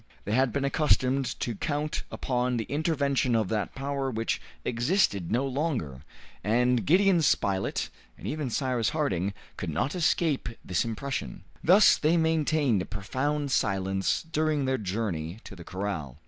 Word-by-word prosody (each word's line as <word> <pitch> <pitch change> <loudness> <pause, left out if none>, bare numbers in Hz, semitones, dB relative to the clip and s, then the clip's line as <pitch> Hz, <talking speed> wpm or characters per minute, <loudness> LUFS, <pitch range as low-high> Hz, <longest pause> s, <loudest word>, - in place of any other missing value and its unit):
They 105 - -3
had 130 +2 +3
been 140 +2 -1
accustomed 135 -2 +1
to 120 - -1
count 145 +7 -2
upon 125 -1 -1
the 115 - -1
intervention 140 -3 0
of 110 -4 +1
that 105 -2 -2
power 135 0 -2
which 115 -2 -2 0.2
existed 120 - +1
no 125 +4 +2
longer, 130 - -2 0.4
and 120 +3 +2
Gideon 185 +2 +5
Spilett, 95 -9 +1 0.3
and - - -11
even 150 -4 -2
Cyrus 125 -3 0
Harding, 100 - 0 0.3
could 95 - -4
not 120 - -1
escape 165 -5 +1 0.2
this 90 -3 +1
impression. 130 +5 -4 0.2
Thus 190 +5 +7
they 160 +3 +2
maintained 155 - +2
a - - -3
profound 135 +8 -2
silence 95 -3 +1
during 155 -3 0
their 130 -1 0
journey 95 -4 -3
to - - -10
the 85 - -10
corral. 95 -9 -4
130 Hz, 145 wpm, -28 LUFS, 105-150 Hz, 0.4 s, Thus